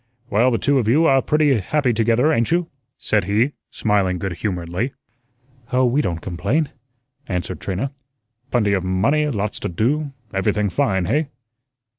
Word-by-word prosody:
"Well, 115 +5 +4
you 115 - +2
two 135 +5 +3
are 135 -3 +5
pretty 150 -5 +2
happy 130 +5 +1
together, 115 +7 +2
ain't 115 -3 +1
you?" 170 0 0 0.3
said 105 -4 0
he, 110 +8 +2 0.2
smiling 100 -4 +1
good 95 +1 -3
humoredly. 90 - -3 0.8
"Oh, 130 +1 +3
we 125 +4 +2
don't 85 - -2
complain," 135 - -1 0.6
answered 90 -2 -3
Trina. 100 +9 -3 0.6
"Plenty 105 -6 +2
of 95 -2 0
money, 115 +12 +1
lots 105 -5 -2
to - - -3
do, 140 - 0 0.2
everything 100 +1 0
fine, 95 +1 +1
hey?" 150 - +1
115 Hz, 145 wpm, -21 LUFS, 95-140 Hz, 0.8 s, are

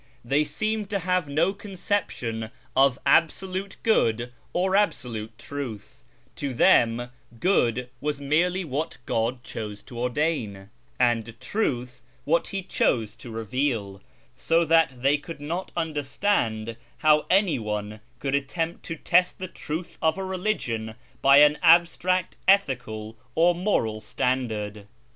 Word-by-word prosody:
They 140 +5 +2
seemed 215 +7 -2
to 205 - 0
have 180 -3 0
no 160 +7 +1
conception 180 - -3 0.3
of 135 -1 +4
Absolute 185 +4 +1
Good 120 - +2 0.2
or 190 +2 +1
Absolute 115 - -1
Truth: 120 -4 -7 0.4
to 140 -3 -3
them 120 +1 +4 0.3
Good 125 - +2
was 145 +1 -2
merely 175 +6 +1
what 155 +3 -3
God 120 +2 -1
chose 105 -4 -6
to 120 - -9
ordain, 120 -7 -2 0.3
and 115 -2 +1
Truth 125 - -2 0.2
what 165 +2 +2
He 195 -1 -4
chose 110 - 0
to 120 - -10
reveal, 115 -3 -2 0.3
so 165 +1 +2
that 160 -6 +3
they 145 +2 +3
could 165 +1 -9
not 170 +6 -4
understand 145 - -1 0.3
how 150 0 +5
any 190 -6 +3
one 105 0 -4 0.2
could 135 +2 -3
attempt 160 +5 -2
to 165 - -4
test 180 +3 +2
the 185 - -5
truth 165 0 -6
of 160 +2 +2
a 195 - -3
religion 175 - -2 0.3
by 140 +1 +7
an 150 0 +5
abstract 175 +2 +3
ethical 120 - +1 0.2
or 170 +2 +5
moral 170 - 0
standard. 105 -3 -2
140 Hz, 130 wpm, -25 LUFS, 115-175 Hz, 0.4 s, by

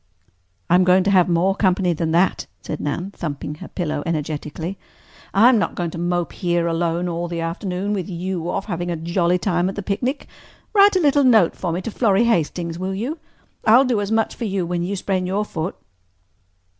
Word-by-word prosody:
"I'm 180 +2 +5
going 185 +1 +4
to 195 - +1
have 180 -2 +4
more 175 +3 +2
company 185 -2 +1
than 165 0 -2
that," 175 +4 +1 0.2
said 150 - -5
Nan, 170 +6 -3
thumping 150 -5 -5
her - - -7
pillow 155 -5 -3
energetically. 160 +3 -4 0.5
"I'm 230 +4 +5
not - - -1
going 170 -2 -2
to 165 - -6
mope 175 0 -1
here 175 -2 0
alone 170 +1 0
all 170 0 -3
the 170 -1 -4
afternoon, 180 +4 -3
with 190 -3 -3
you 175 -1 -3
off - - -2
having 175 -3 -3
a 170 - -1
jolly 170 +2 +1
time 180 -1 0
at 195 - -6
the 205 - -4
picnic. 245 +9 -2 0.5
Write 405 -1 +6
a - - +4
little 285 -2 +4
note 220 -9 +4
for 175 - -3
me 175 +3 -2
to 230 - -4
Florrie 205 -1 +2
Hastings, 170 -5 0
will 190 +1 -3
you? 260 - -4 0.4
I'll 245 +5 +6
do 240 -5 +1
as 200 +1 -3
much 225 0 +1
for 235 - -5
you 195 -3 -1
when 175 0 -2
you 185 +4 -2
sprain 185 -1 -1
your 200 +3 -1
foot." 165 -1 -4
180 Hz, 200 wpm, -21 LUFS, 170-200 Hz, 0.5 s, Write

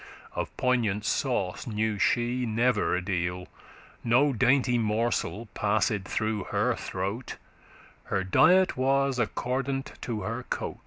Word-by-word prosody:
Of - - -3
poignant 115 -5 +1
sauce 115 -9 -1
knew 110 -1 -1
she 120 +3 +1
never 115 +1 +1
a 90 - -2
deal.* 90 -1 -1
*whit 90 - -12 0.6
No 130 +5 +3
dainty 125 0 +3
morsel 115 0 -1
passed 105 +2 +1
through 110 -2 -2
her - - +1
throat; 100 +7 -4 0.7
Her 95 - -1
diet 180 - +4
was 135 0 +1
*accordant 135 +4 -2
to 110 -3 -3
her 115 +3 -3
cote. - - -4
115 Hz, 125 wpm, -27 LUFS, 105-125 Hz, 0.7 s, diet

